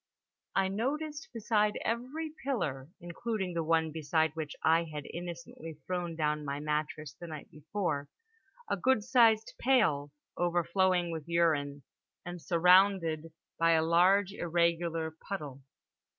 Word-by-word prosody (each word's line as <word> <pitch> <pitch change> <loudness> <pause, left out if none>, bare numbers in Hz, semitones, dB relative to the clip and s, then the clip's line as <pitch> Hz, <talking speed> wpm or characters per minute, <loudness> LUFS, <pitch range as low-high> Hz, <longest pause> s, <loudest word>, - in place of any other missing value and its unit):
I 195 0 +3
noticed 295 +9 -3
beside 210 -2 +1
every 260 +8 -2
pillar 155 - -2
(including 190 +2 -4
the 165 -1 -1
one 160 0 +1
beside 160 +1 +1
which 155 -2 -5
I 165 +1 +4
had 150 -3 -7
innocently 170 -2 -8
thrown 175 -2 -3
down 150 -1 0
my 140 0 -3
mattress 150 -1 -3
the 175 - -10
night 155 -3 -9
before) 150 -2 -3 0.6
a - - -1
good 260 -5 +2
sized 230 -3 +4
pail, 150 - +2 0.2
overflowing 175 +1 +1
with 160 -2 -6
urine, 150 -5 +1 0.4
and 175 0 -7
surrounded 175 -2 +3 0.3
by 165 0 +4
a 160 -1 +3
large 185 +4 +4
irregular 170 -2 0 0.2
puddle. 150 -9 -5
170 Hz, 125 wpm, -31 LUFS, 155-200 Hz, 0.6 s, I